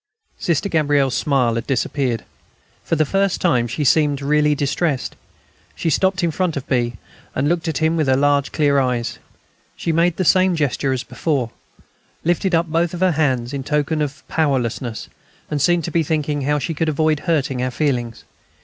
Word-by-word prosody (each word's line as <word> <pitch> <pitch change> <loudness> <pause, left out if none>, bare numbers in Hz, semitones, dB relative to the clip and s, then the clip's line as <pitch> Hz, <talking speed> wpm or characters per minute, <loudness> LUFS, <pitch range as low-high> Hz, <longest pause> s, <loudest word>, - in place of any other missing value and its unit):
Sister 170 +2 0
Gabrielle's 145 -6 +2
smile 135 -6 +1
had 115 - -3
disappeared. 130 -3 -1 0.6
For - - 0
the 155 0 +2
first 195 +4 +1
time, 125 -9 +2
she 135 +6 -3
seemed 145 0 +3
really 150 +1 +2
distressed. 140 0 -1 0.6
She 165 - -1
stopped 190 +3 +1
in 170 - +2
front 170 -1 -1
of 140 - -6
B., 120 -2 0 0.4
and 135 +3 +1
looked 170 +1 0
at 160 - -1
him 160 +1 +1
with 155 -3 +1
her 130 - +4
large 145 0 +2
clear 145 -2 +2
eyes. 120 -3 -1 0.6
She 165 - -2
made 170 +1 +2
the 185 - 0
same 185 +1 +4
gesture 140 -3 0
as 130 0 -1
before; 135 -9 -2 0.7
lifted 175 +2 +1
up 165 +1 +2
both 165 +1 0
her 185 0 +3
hands, 130 -5 0
in 140 -1 -3
token 150 +2 0
of 145 -1 -4
powerlessness, 125 -6 -1 0.4
and 150 -2 -1
seemed 175 +2 +3
to - - -4
be 170 - +2
thinking 150 -2 -1
how 150 +2 +1
she 145 +3 -2
could 160 +1 -1
avoid 155 0 +1
hurting 140 -7 0
our 130 - 0
feelings. 125 -4 -2
150 Hz, 180 wpm, -20 LUFS, 135-165 Hz, 0.7 s, her